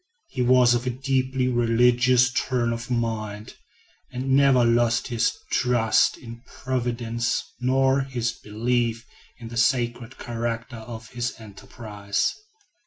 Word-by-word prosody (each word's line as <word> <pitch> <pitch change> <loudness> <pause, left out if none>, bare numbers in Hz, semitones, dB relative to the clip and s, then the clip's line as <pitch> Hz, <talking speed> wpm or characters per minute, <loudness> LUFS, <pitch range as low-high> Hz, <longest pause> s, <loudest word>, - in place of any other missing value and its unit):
He 130 - -3
was 125 0 +5
of 120 +1 -1
a - - +2
deeply 130 0 -1
religious 125 +1 +3
turn 120 -3 0
of 115 +1 -6
mind, 110 -3 -3 0.6
and 130 +1 -3
never 135 -2 +5
lost 115 +1 +2
his 115 -1 0
trust 120 -3 +2
in 115 -1 -11
Providence 120 -2 -2 0.2
nor 130 +2 +2
his 125 -3 -2
belief 115 +2 -2 0.3
in 115 -2 -9
the 115 - -7
sacred 120 0 0
character 115 0 -4
of 110 -1 -9
his 120 0 -4
enterprise. 105 -1 -4
120 Hz, 120 wpm, -24 LUFS, 115-125 Hz, 0.6 s, was